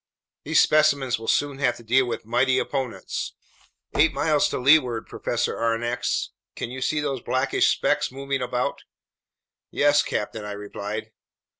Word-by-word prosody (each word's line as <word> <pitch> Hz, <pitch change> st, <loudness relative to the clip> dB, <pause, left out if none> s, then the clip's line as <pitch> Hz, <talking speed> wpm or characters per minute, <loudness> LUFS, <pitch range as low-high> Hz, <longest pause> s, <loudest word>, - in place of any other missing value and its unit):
These 155 Hz, +2 st, +3 dB
specimens 140 Hz, -5 st, +3 dB
will 115 Hz, -, -9 dB
soon 145 Hz, -1 st, +1 dB
have 125 Hz, -4 st, +1 dB
to 120 Hz, -, -13 dB
deal 125 Hz, +3 st, +3 dB
with 115 Hz, -1 st, -4 dB
mighty 125 Hz, +3 st, +2 dB
opponents. 135 Hz, -4 st, -3 dB, 0.6 s
Eight 160 Hz, +2 st, +4 dB
miles 150 Hz, -2 st, +2 dB
to -, -, -2 dB
leeward, 130 Hz, -4 st, +3 dB
Professor 120 Hz, 0 st, -2 dB
Aronnax, 120 Hz, +1 st, -1 dB, 0.3 s
can 115 Hz, -, -5 dB
you 130 Hz, +1 st, -6 dB
see 150 Hz, +3 st, 0 dB
those 135 Hz, -4 st, -2 dB
blackish 130 Hz, +1 st, +1 dB
specks -, -, +1 dB
moving 135 Hz, 0 st, -3 dB
about?" 125 Hz, 0 st, -2 dB, 0.9 s
"Yes, 145 Hz, 0 st, +3 dB
captain," 105 Hz, +1 st, -3 dB
I 105 Hz, 0 st, -5 dB
replied. 105 Hz, +2 st, -6 dB
130 Hz, 145 wpm, -24 LUFS, 115-140 Hz, 0.9 s, Eight